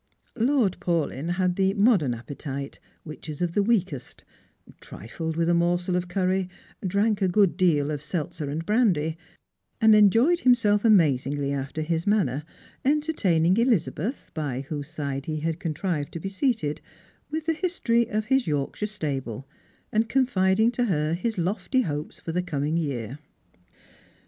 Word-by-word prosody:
Lord 240 -5 +2
Paulyn 165 -1 -1
had 180 0 0
the 195 0 +2
modern 200 - +3
appetite, 140 +3 -7 0.2
which 155 0 -9
is 150 - -6
of 175 -1 -1
the 205 - +3
weakest, 195 - -1 0.6
trided 160 - -6
with 165 0 +1
a 175 - +3
morsel 175 +1 +1
of 180 0 -1
curry, 185 0 0 0.3
drank 200 +3 +1
a 190 - +3
good 185 -3 +3
deal 155 -6 +2
of 145 -2 -3
seltzer 150 -1 -4
and 160 +3 -4
brandy, 190 -9 +2 0.6
and 220 -2 +6
enjoyed 225 - +5
him 250 -5 +5
self 210 -3 +1
amazingly 145 - +3
after 140 +3 -3
his 165 +2 -2
manner, 155 - +1 0.4
entertaining 220 - +2
Elizabeth, 230 - 0
by 140 -5 -3
whose 145 0 -5
side 140 -4 -4
he 155 -1 -3
had 165 +1 -2
contrived 160 -3 -2
to 165 - -4
be 195 - -4
seated, 200 - -1 0.5
with 315 +1 -3
the 325 - +2
history 300 -10 0
of 215 +2 -2
hi« 265 - +5
Yorkshire 150 +6 -2
stable, 135 - -4 0.4
and 220 +1 +1
confiding 220 -4 +3
to 245 0 0
her 155 -6 0
his 220 +6 -2
lofty 205 +9 0
hopes 150 -7 -4
for 165 - -5
the 180 +2 0
coming 150 -3 -2
year. 135 -5 -3
175 Hz, 155 wpm, -25 LUFS, 150-215 Hz, 0.6 s, and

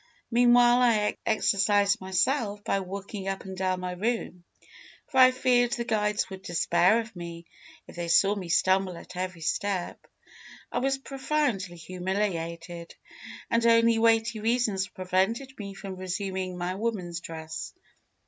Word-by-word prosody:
Meanwhile, 240 +1 +5
I 215 -4 +2
exercised 205 -2 +2
myself 205 +2 0
by 195 - 0
walking 195 +1 -6
up 195 0 -3
and 190 0 -7
down 185 -1 -1
my 180 0 -3
room, 180 -2 -3 0.6
for 265 -3 -1
I 255 0 +9
feared 250 -1 +2
the 240 -3 -2
guides 210 -2 0
would 190 0 -7
despair 175 +4 +2
of 225 -3 -12
me 170 -1 -8 0.4
if - - -14
they 170 -1 -3
saw 195 +4 +4
me 190 -4 -6
stumble 185 0 +2
at 180 - -12
every 180 -2 -4
step. 185 +2 -2 0.6
I - - 0
was 270 +1 +1
profoundly 270 - -2
humiliated, 170 -1 -4 0.6
and 230 0 +2
only 230 0 +5
weighty 225 0 +3
reasons 220 -4 0
prevented 195 +9 -1
me 200 -1 -7
from 195 -1 -7
resuming 185 0 -3
my 180 +1 -2
woman's 190 -5 -3
dress. 160 -1 -7
195 Hz, 140 wpm, -27 LUFS, 180-230 Hz, 0.6 s, I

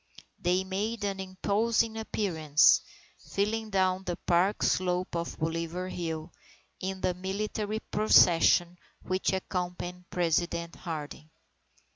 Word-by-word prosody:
They 180 +1 +1
made 205 +4 -3
an 200 -1 -2
imposing 215 +4 0
appearance, 160 -9 +3 0.4
filing 215 +2 -2
down 190 -1 +1
the 180 -2 -3
park 180 +3 +1
slope 180 -1 0
of 170 0 -3
Bolivar 165 +3 -3
Hill, 165 -2 -4 0.5
in 190 0 -4
the 180 - +1
military 210 +3 -3
procession 175 -4 +4 0.2
which 185 0 0
accompanied 180 -1 -4
President 170 0 0
Harding. 155 -2 -7
185 Hz, 105 wpm, -29 LUFS, 170-200 Hz, 0.5 s, procession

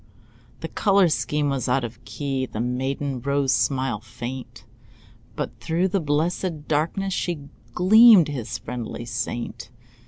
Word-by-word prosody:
The - - -3
color 195 -3 +3
scheme 150 -2 0
was 135 -2 -2
out 130 +1 +2
of 120 +1 -7
key, 135 -3 -3
The 110 - -6
maiden 130 +2 -2
rose 140 0 +1
smile 120 -1 0
faint, 120 +3 -8 0.7
But - - -5
through 175 +4 0
the 195 - +1
blessed 155 +1 -1
darkness 165 +6 0
She 160 -7 -3 0.3
gleamed, 210 -1 +7
his 135 -7 -4
friendly 120 -1 -6
saint. 120 0 -4
140 Hz, 130 wpm, -24 LUFS, 125-165 Hz, 0.7 s, gleamed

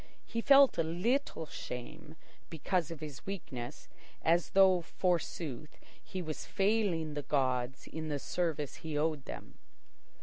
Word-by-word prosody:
He 230 - -2
felt 275 -2 +7
a - - +4
little 180 - 0
shame 155 +4 -7 0.3
because 165 +1 0
of 165 -2 -7
his 150 -5 -7
weakness, 140 -9 -6 0.4
as 170 +1 +3
though, 190 -2 +7
forsooth, 165 -5 -2 0.3
he 185 -1 -5
were 155 -1 -2
failing 195 -5 0
the 145 - -2
gods 130 -2 0
in 160 0 -5
the 150 -2 -1
service 150 -1 -2
he 155 -2 -4
owed 150 -2 0
them. - - -9
160 Hz, 135 wpm, -33 LUFS, 145-180 Hz, 0.4 s, felt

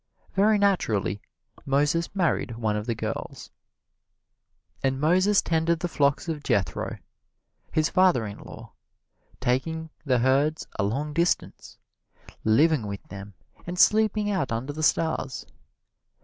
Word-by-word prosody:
Very 210 +2 +4
naturally 110 - +1 0.4
Moses 145 +4 +1
married 165 - 0
one 110 -2 -1
of 105 +2 -4
the 115 - -1
girls. - - -6 1.3
And 135 0 0
Moses 185 +7 +3
tended 165 0 +1
the 175 - -2
flocks 140 -1 +1
of 160 -3 -3
Jethro, 95 - -1 0.7
his 155 0 +2
father 185 -11 +3
in 100 -1 -7
law, - - -12 0.7
taking 160 +6 -1
the 130 -4 +2
herds 135 +5 +1
a - - +2
long 140 +9 -2
distance, 170 +2 -1 0.7
living 120 +2 +3
with 100 -1 -6
them 100 0 -9 0.3
and 175 +1 -4
sleeping 215 +1 +3
out 180 - -1
under 120 +6 -3
the 155 - -6
stars. 155 -4 0
150 Hz, 125 wpm, -26 LUFS, 115-170 Hz, 1.3 s, Very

